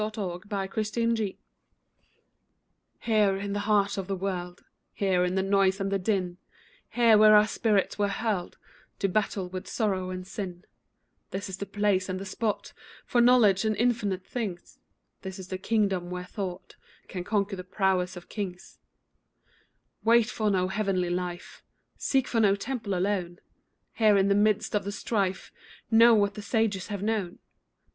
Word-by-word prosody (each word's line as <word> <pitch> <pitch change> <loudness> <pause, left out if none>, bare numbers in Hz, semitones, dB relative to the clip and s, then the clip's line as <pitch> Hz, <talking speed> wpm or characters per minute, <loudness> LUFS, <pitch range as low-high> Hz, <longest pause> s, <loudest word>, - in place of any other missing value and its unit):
HERE 215 - 0
AND 180 -2 -4
NOW 215 +3 -1 1.8
Here, 210 -4 +3
in 200 0 -4
the 205 - -1
heart 200 -1 +2
of 190 - -5
the 195 - -1
world, 180 -2 -4 0.3
Here, 190 -3 +1
in 180 +1 0
the 190 - +1
noise 195 0 +2
and 195 0 -2
the 195 - +1
din, 185 -2 -1 0.5
Here, 230 -3 +5
where 215 0 +8
our 210 0 +7
spirits 215 -2 0
were 205 - +3
hurled 200 -3 -2 0.4
To 195 - 0
battle 195 -1 -1
with 185 0 -7
sorrow 190 -5 -1
and 185 0 -5
sin, 185 -2 -6 0.6
This 195 +1 -5
is 190 - -5
the 200 - -4
place 200 -1 0
and 185 0 -2
the 195 - -6
spot 210 +2 -3 0.3
For 240 - +2
knowledge 235 -6 +5
of 215 -1 +1
infinite 210 -6 0
things 200 -8 -5 0.4
This 190 0 -7
is 190 -1 -9
the 185 - -4
kingdom 195 -4 0
where 180 0 -5
Thought 185 -1 -6 0.3
Can 180 -2 -5
conquer 200 0 0
the 185 - -7
prowess 185 -1 0
of 175 - -11
kings 185 -4 -6 1.2
Wait 230 -1 +4
for 215 -1 0
no 185 -2 +1
heavenly 190 -3 0
life, 175 0 -5 0.3
Seek 265 -2 0
for 230 - 0
no 200 -3 +4
temple 220 -2 -3
alone; 180 -2 -1 0.6
Here, 215 -3 +4
in 195 0 +3
the - - +5
midst 210 +1 +2
of 210 - +1
the 200 - -4
strife, 200 -3 -2 0.4
Know 230 +1 +7
what 205 -1 +2
the 210 - -7
sages 205 -3 0
have 205 -2 -4
known. 210 -5 -1
200 Hz, 165 wpm, -27 LUFS, 185-215 Hz, 1.8 s, where